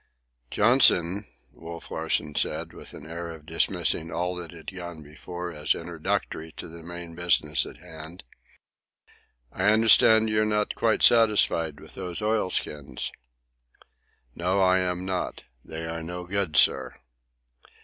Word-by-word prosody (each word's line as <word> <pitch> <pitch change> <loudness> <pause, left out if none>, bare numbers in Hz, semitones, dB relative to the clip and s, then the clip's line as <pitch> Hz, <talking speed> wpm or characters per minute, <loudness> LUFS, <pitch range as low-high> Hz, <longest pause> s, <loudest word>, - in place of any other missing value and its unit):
"Johnson," 105 -4 +4 0.3
Wolf 85 0 -10
Larsen 75 - -1
said, - - -1
with - - -10
an 75 - -11
air 85 +1 -6
of 80 -2 -10
dismissing 80 0 0
all 90 +1 -2
that 85 -2 -5
had 85 +3 -10
gone 85 -3 -8
before 85 +4 -7
as 75 0 0
introductory 80 -1 -3
to - - -8
the 85 0 -11
main 85 0 -8
business 85 0 +1
in - - -10
hand, 80 +3 -11 1.3
"I - - -2
understand 110 +1 +6
you're 110 0 +2
not 105 -1 0
quite 115 -1 +1
satisfied 105 -9 +4
with - - -12
those 90 -2 -4
oilskins?" 90 - -1 1.2
"No, 90 +6 0
I 95 -1 +4
am 90 0 -2
not. 95 -1 -3 0.2
They 80 +1 -7
are 80 0 -5
no 90 +2 -6
good, 90 -4 -1
sir." - - +3
85 Hz, 135 wpm, -26 LUFS, 80-95 Hz, 1.3 s, understand